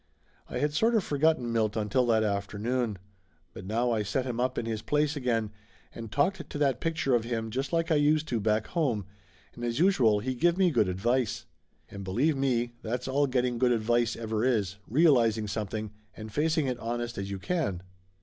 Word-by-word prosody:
I - - -4
had 150 0 0
sort 225 +9 +2
of 215 - +3
forgotten 145 -6 +1
Milt 110 -2 +1
until 120 +4 +1
that 110 -2 +3
after 100 0 -2
noon. 120 -1 -1 0.6
But 95 - -9
now 120 +3 +1
I 110 -2 +1
set 115 +6 -1
him 120 -2 -3
up 130 +1 0
in - - -1
his 110 -1 -3
place 150 +3 +1
again 115 -6 -1 0.4
and 115 -2 -8
talked 170 - 0
to - - -5
that 140 -4 +1
picture 165 -5 0
of 120 -2 +3
him 115 -1 -3
just 135 +4 -3
like 165 -1 0
I 155 - +4
used 155 +1 +2
to 120 - 0
do - - -3
back 110 +1 +1
home, 130 - -1 0.5
and 120 - -9
as 120 -1 -1
usual 130 - +4
he 130 +5 -2
give 170 +7 +2
me 185 -2 +4
good 105 -10 +2
advice. 120 +6 0 0.4
And, 100 -1 -8
be 95 -1 -5
lieve 145 +8 +2
me, 120 -3 0
that's 120 +3 -3
all 140 +2 +2
getting 125 -2 0
good 125 0 +3
advice 120 0 +1
ever 110 -1 -2
is 105 -7 +1
rea 155 +10 +4
lizing 115 -5 +3
something, 105 0 -4 0.3
and 110 -1 -8
facing 155 +1 +1
it 125 -2 -2
honest 120 -1 -3
as 100 0 -4
you 100 - -4
can. 100 - -2
120 Hz, 210 wpm, -28 LUFS, 110-140 Hz, 0.6 s, I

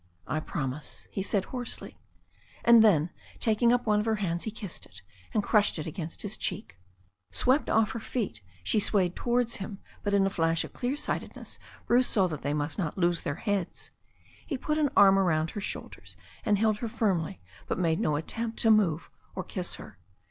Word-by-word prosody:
"I 155 - -1
promise," 150 -2 -4
he 195 - -2
said 195 0 0
hoarsely; 245 -2 -4 0.7
and 235 -1 +8
then, 170 -6 +4 0.3
taking 230 +1 +3
up 245 0 +2
one 210 -1 +3
of 210 - -1
her 220 - +3
hands, 175 -5 -2
he - - -1
kissed 210 -5 -7
it, 90 0 -14 0.3
and 210 - +1
crushed 205 -3 +3
it 155 - -4
against 165 0 -6
his - - -3
cheek. 85 - -4 0.5
Swept 255 - +2
off 220 -2 +3
her 230 - -4
feet, 210 - -3 0.2
she 215 - +2
swayed 190 -4 +2
towards 240 -1 +1
him, 195 0 -6 0.2
but 205 -1 +1
in 195 -1 +4
a 195 - +1
flash 165 -2 +1
of - - -9
clear 255 +3 -2
sightedness 300 - -4 0.3
Bruce 245 +1 +4
saw 195 -3 +2
that 155 -3 -5
they 145 +2 -1
must 150 +4 -2
not 165 -3 -2
lose 175 -2 +2
their 140 - -2
heads. 200 -3 -2 0.5
He 280 - -3
put 305 +4 -1
an 295 -2 +3
arm 195 -1 +8
about 160 -4 +2
her 205 - -5
shoulders, - - -6 0.3
and 210 -1 +3
held 215 0 +2
her 235 - -2
firmly, 185 - 0 0.3
but - - -1
made 165 -2 +1
no 150 - +1
attempt 225 +9 -3
to 225 - +5
move 180 -7 +2 0.2
or - - -3
kiss - - -3
her. - - -12
200 Hz, 195 wpm, -29 LUFS, 165-225 Hz, 0.7 s, and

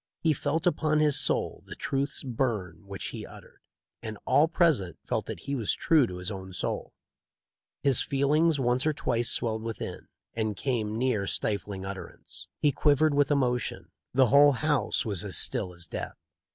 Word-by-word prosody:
He 160 -2 +3
felt 150 +3 -2
upon 155 -3 +2
his 150 -1 +6
soul - - 0
the - - -8
truths 140 +1 -2
burn 105 - -3
which' 100 -1 -5
he - - -7
uttered, - - -14 0.4
and 110 -2 -6
all 155 - +4
present 155 - +1
felt - - -2
that - - -6
he 140 - -4
was 120 -7 0
true 155 -7 +3
to 90 - -7
his 90 +3 -3
own 95 -1 -7
soul. - - -4 0.9
His 135 -4 +6
feelings 145 +3 +2
once 125 +2 +1
or 155 - +2
twice 120 -4 0
swelled 110 -2 0
within, 115 -2 -6 0.3
and 110 -3 -2
came 110 -4 -1
near 115 -5 0
stifling 100 -2 -3
utterance. 95 -1 -9
He 145 - +2
quivered 145 +2 +3
with 145 0 +2
emotion. 125 -5 -1 0.2
The 130 -1 +4
whole 145 0 +7
house 145 0 0
was 100 -4 -2
as 95 -7 -1
still 90 - +1
as 85 0 -8
death. - - -6
125 Hz, 170 wpm, -28 LUFS, 105-145 Hz, 0.9 s, whole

